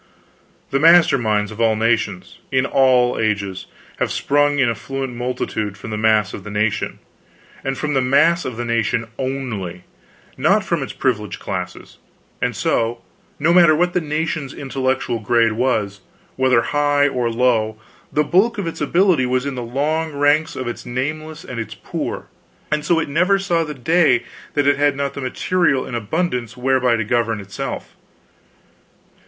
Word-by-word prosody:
The 140 - +2
master 165 -3 +6
minds 105 -2 0
of 110 +1 -6
all 110 -1 +3
nations, 110 -4 -1
in 130 0 +2
all 130 -3 +3
ages, 100 -4 -1 0.3
have - - -1
sprung 145 0 +2
in 130 -3 +3
affluent 130 +3 -3
multitude 120 -4 -3
from 110 - -8
the - - -2
mass 110 -2 +2
of 100 - -7
the 105 - -8
nation, 105 +1 -1 0.7
and 135 0 -2
from 150 -1 -2
the 135 - +2
mass 155 +7 +3
of 125 -3 -5
the 120 - -3
nation 115 0 0
only 115 -10 -4 0.5
not 190 +10 +3
from 170 -5 -1
its 135 - -4
privileged 120 -6 -2
classes; 90 -2 -6 0.4
and - - 0
so, 115 +1 0 0.3
no 160 +4 +2
matter 170 -3 +6
what 175 +2 +1
the 180 - +1
nation's 155 -2 -3
intellectual 130 -3 -1
grade 115 +1 +2
was; 110 -4 -1 0.3
whether 130 -3 +3
high 145 -1 +2
or 125 -4 -1
low, 115 -2 +1 0.3
the 150 - +2
bulk 195 +10 +2
of 200 - -2
its 165 - -5
ability 170 -3 +3
was 130 +1 0
in 140 - -2
the 125 - -4
long 150 +6 -1
ranks 145 +3 +2
of 130 - -4
its 120 - -5
nameless 155 +6 -4
and 125 -2 -6
its 115 - -5
poor, - - -5 0.5
and 150 0 0
so 170 - +2
it 165 - -2
never 180 +7 +2
saw 175 -4 0
the 150 -2 -6
day 155 -2 +3 0.3
that 145 -1 +2
it 145 0 +4
had 145 -1 +2
not 140 0 -2
the 140 - -6
material 140 +2 +1
in - - -8
abundance 125 - -2
whereby 130 -1 +2
to 110 - -1
govern 115 0 0
itself. 100 -1 -6
130 Hz, 170 wpm, -20 LUFS, 115-150 Hz, 0.7 s, master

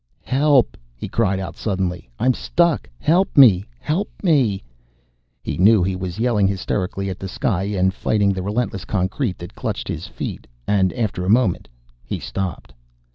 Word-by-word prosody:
"Help!" 140 -1 +3 0.2
he - - -6
cried 100 -4 +1
out 95 - -5
suddenly. 90 - -3
"I'm 130 +1 +3
stuck! 170 - +1
Help 175 - +1
me, 105 -9 +7
help 180 +7 -1
me!" 130 - +2 0.8
He - - -4
knew 105 0 +6
he 95 +1 0
was 90 0 -5
yelling 110 -4 +2
hysterically 95 0 -2
at 95 - -7
the 95 - -5
sky 95 0 -1
and 95 -2 +1
fighting 100 0 +1
the 95 - -3
relentless 105 0 -2
concrete 95 +2 -1
that 85 - -9
clutched - - -4
his - - -4
feet, - - -6 0.2
and 95 -3 +2
after 105 -6 -2
a 90 - -2
moment 110 -4 +2 0.4
he - - -4
stopped. 90 -10 -5
100 Hz, 160 wpm, -21 LUFS, 95-120 Hz, 0.8 s, me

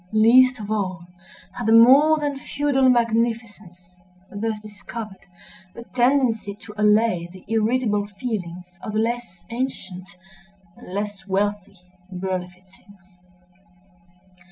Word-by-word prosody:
Least 250 +3 +5
of 210 0 -6
all 185 -5 -2 0.5
had 240 - -5
the 225 - +4
more 270 +7 +7
than 290 -2 -3
feudal 275 -2 +1
magnificence, 225 -7 -1 0.3
thus 215 +1 -3
discovered, 210 -1 -9 0.5
a 235 - -8
tendency 245 -5 +1
to 210 0 -13
allay 210 -4 +2
the 185 0 -14
irritable 220 -1 0
feelings 180 -5 -6
of 215 - -6
the 215 - 0
less 225 -6 -3
ancient 195 -7 -5 0.7
and - - -13
less 205 0 -5
wealthy 205 0 -2 0.3
Berlifitzings. 185 +1 -7
210 Hz, 105 wpm, -22 LUFS, 190-235 Hz, 0.7 s, more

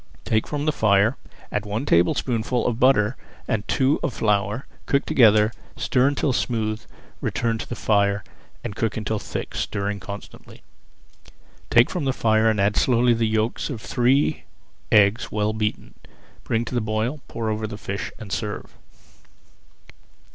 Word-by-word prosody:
Take 110 -1 +1
from 145 0 -3
the 155 - +3
fire, 105 -1 +3 0.4
add 105 - -1
one 105 +5 -3
tablespoonful 115 +5 +1
of 120 -1 -1
butter 125 -3 +4 0.3
and 110 -4 -1
two 135 +3 +2
of 130 - -2
flour, 105 +3 0 0.2
cooked 140 0 +2
together, 110 -3 +5 0.3
stir 130 +1 +2
until 140 -1 +1
smooth, 110 -3 -1 0.4
return 115 -1 -1
to - - -6
the 120 - -3
fire, 100 -2 +1 0.4
and 110 -4 -5
cook 115 0 -1
until 110 0 -2
thick, - - -5
stirring 100 0 -2
constantly. 100 +2 -10 1.1
Take 120 0 +5
from 175 -6 -2
the 135 - +1
fire 110 -1 +3
and 110 -2 0
add 100 +1 +2
slowly 120 -1 +4
the 115 -1 +1
yolks 110 +1 -1
of 130 -6 -4
three 130 +5 +1 0.5
eggs 105 0 +4
well 105 0 0
beaten. 105 -1 -3 0.5
Bring 115 +1 -1
to 120 - -7
the 120 - +1
boil, 110 +7 -2
pour 110 -2 -3
over 110 0 -2
the 105 -1 -7
fish, 100 -1 -5
and 105 -4 -9
serve. 105 -1 -4
110 Hz, 155 wpm, -23 LUFS, 105-120 Hz, 1.1 s, together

